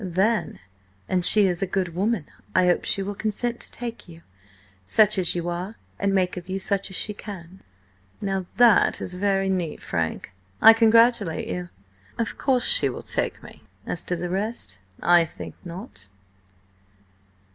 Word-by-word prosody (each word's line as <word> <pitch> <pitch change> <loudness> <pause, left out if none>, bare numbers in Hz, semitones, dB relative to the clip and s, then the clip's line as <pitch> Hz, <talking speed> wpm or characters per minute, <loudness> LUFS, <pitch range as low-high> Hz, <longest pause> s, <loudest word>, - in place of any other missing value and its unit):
"Then, 190 0 0 0.5
an 185 -1 +1
she 205 +3 +7
is 180 -1 0
a 195 - 0
good 185 -2 -2
woman, 195 -1 -1 0.3
I 185 - +4
hope 175 -1 +2
she 195 - +1
will 200 +1 -4
consent 225 +4 -2
to - - -6
take 235 -5 -6
you, 165 0 -14 0.6
such 210 - +3
as 180 -2 +1
you 175 0 -3
are, 180 +5 -4 0.2
and 200 0 +1
make 185 -2 0
of 180 +1 -8
you 190 - -2
such 195 +1 -1
as 190 - -7
she 210 - -1
can!" 190 -3 -10 0.6
"Now 195 -2 -3
that 240 -2 +5
is 180 - -5
very 195 +1 0
neat, 180 -4 -2
Frank. 85 +1 -3 0.3
I 225 - +9
congratulate 225 -5 +3
you. 90 0 -4 0.5
Of 230 - -3
course 255 -3 +1
she - - +5
will - - -7
take - - -3
me; - - -14 0.2
as 175 - -3
to 180 - -1
the 175 +1 -4
rest–I 170 - 0
think 165 - -8
not." 170 - -9
190 Hz, 165 wpm, -24 LUFS, 175-210 Hz, 0.6 s, I